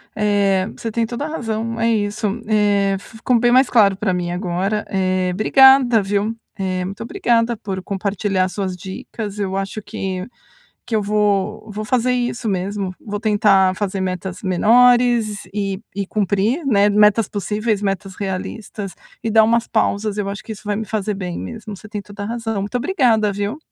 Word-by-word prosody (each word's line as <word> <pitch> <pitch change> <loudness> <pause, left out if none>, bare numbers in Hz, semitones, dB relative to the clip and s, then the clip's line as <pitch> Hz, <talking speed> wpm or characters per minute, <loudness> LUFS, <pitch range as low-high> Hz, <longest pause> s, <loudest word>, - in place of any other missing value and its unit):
Eh, 200 -3 +2
você 225 - -4
tem 230 +1 0
toda 240 +5 -4
a - - -4
razão. 230 -6 -3
É 230 - +2
isso. 210 -1 0 0.2
Eh, 205 -2 +2
ficou 225 +4 -1
bem 240 +1 +3
mais 260 +1 +5
claro 205 -5 +5
pra 195 -2 0
mim 175 -1 -2
agora, 185 +3 -1
eh, 185 -1 0
obrigada, 255 +3 +6
viu? 205 +3 -1 0.2
Eh, 185 -1 -1
muito 195 +4 -7
obrigada 235 0 +1
por 195 -2 -5
compartilhar 195 -1 -1
as 185 - -5
suas 190 -3 -3
dicas, 200 +3 -7
eu 195 -1 -1
acho 195 +2 -4
que 185 -1 -4 0.6
que 230 - -3
eu - - +2
vou, 210 +1 0
vou 210 +1 -4
fazer 250 +2 +1
isso 240 -1 -2
mesmo, 195 0 -2
vou 205 -1 -5
tentar 205 -3 +3
fazer 195 -1 -2
metas 185 0 -4
menores 230 +2 +3
e 195 -2 -2 0.2
e 200 -1 -2
cumprir, 210 - 0
né, 205 -5 +4
metas 210 +1 +4
possíveis, 210 +1 -1
metas 195 -1 -2
realistas 195 +1 -5 0.3
e 225 - -1
dar 220 0 +6
umas 230 +1 +2
pausas, 210 -1 0
eu 200 -1 -1
acho 200 0 -6
que 225 - -6
isso 210 - -10
vai 205 0 0
me 220 - -3
fazer 210 0 -2
bem 180 -3 -5
mesmo, 220 -3 -7
você 215 - -13
tem 210 -1 -5
toda 205 +1 -9
a - - -4
razão. 225 -2 -3
Muito 205 +5 -3
obrigada, 240 - +2
viu? 205 +6 -3
205 Hz, 180 wpm, -20 LUFS, 195-225 Hz, 0.6 s, obrigada